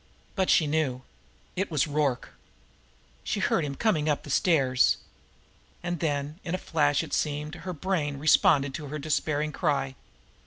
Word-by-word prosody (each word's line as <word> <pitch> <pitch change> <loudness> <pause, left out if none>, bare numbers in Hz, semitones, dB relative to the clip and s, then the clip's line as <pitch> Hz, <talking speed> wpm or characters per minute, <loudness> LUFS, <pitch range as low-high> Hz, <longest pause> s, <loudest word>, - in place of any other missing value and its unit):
But 190 -2 0
she 160 - +5
knew. 145 -4 -1 0.5
It 190 +1 -1
was 150 -5 +1
Rorke! 145 -4 -1 0.9
She - - -2
heard - - +1
him 140 -2 -3
coming 155 -8 +1
up 145 - 0
the 145 - -7
stairs. 135 -7 +3 0.9
And 175 -1 -2
then, 145 0 -2
in 175 0 -2
a - - -1
flash, 145 -5 +1
it - - -8
seemed, 150 0 -1
her 175 +2 -6
brain 155 -4 -1
responded 145 -2 +4
to 145 +1 -6
her 150 +2 -5
despairing 150 0 -1
cry. 145 -5 0
150 Hz, 155 wpm, -27 LUFS, 145-165 Hz, 0.9 s, she